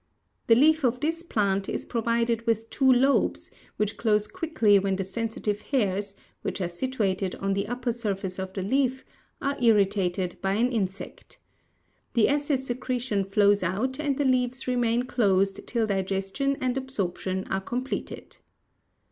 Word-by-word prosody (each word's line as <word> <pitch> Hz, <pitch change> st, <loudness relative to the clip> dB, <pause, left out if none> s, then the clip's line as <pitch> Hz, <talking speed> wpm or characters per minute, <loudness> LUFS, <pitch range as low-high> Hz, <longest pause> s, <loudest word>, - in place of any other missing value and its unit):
The 230 Hz, -, +7 dB
leaf 310 Hz, +4 st, +4 dB
of 250 Hz, -1 st, +1 dB
this 325 Hz, +4 st, -1 dB
plant 200 Hz, -, 0 dB
is -, -, -3 dB
provided 230 Hz, 0 st, 0 dB
with 225 Hz, 0 st, 0 dB
two 265 Hz, -1 st, +4 dB
lobes, 265 Hz, +2 st, +2 dB, 0.3 s
which 210 Hz, 0 st, -1 dB
close 210 Hz, -2 st, +2 dB
quickly 270 Hz, -, +2 dB
when 195 Hz, 0 st, 0 dB
the 195 Hz, -, -2 dB
sensitive 215 Hz, 0 st, -3 dB
hairs, 200 Hz, -6 st, -1 dB, 0.3 s
which -, -, -4 dB
are 180 Hz, -, -1 dB
situated 195 Hz, -1 st, -2 dB
on 195 Hz, 0 st, -1 dB
the 200 Hz, +1 st, -1 dB
upper 245 Hz, +1 st, -2 dB
surface 195 Hz, -5 st, -3 dB
of 190 Hz, 0 st, -4 dB
the 190 Hz, -, -3 dB
leaf, 260 Hz, +4 st, 0 dB, 0.4 s
are 280 Hz, -1 st, -1 dB
irritated 195 Hz, -5 st, +2 dB
by 195 Hz, 0 st, 0 dB
an 240 Hz, +5 st, +2 dB
insect. 195 Hz, -5 st, -4 dB, 0.8 s
The 230 Hz, -, +4 dB
acid 285 Hz, -2 st, 0 dB
secretion 245 Hz, -4 st, -1 dB
flows 200 Hz, +1 st, +3 dB
out 215 Hz, -, -1 dB
and 285 Hz, -3 st, 0 dB
the 285 Hz, -, +1 dB
leaves 255 Hz, 0 st, +1 dB
remain 245 Hz, -1 st, +1 dB
closed 195 Hz, -6 st, +1 dB
till 235 Hz, -2 st, 0 dB
digestion 195 Hz, +7 st, -1 dB
and 255 Hz, -1 st, 0 dB
absorption 190 Hz, -7 st, -2 dB
are 190 Hz, -, 0 dB
completed. 250 Hz, +6 st, -5 dB
225 Hz, 150 wpm, -26 LUFS, 195-255 Hz, 0.8 s, The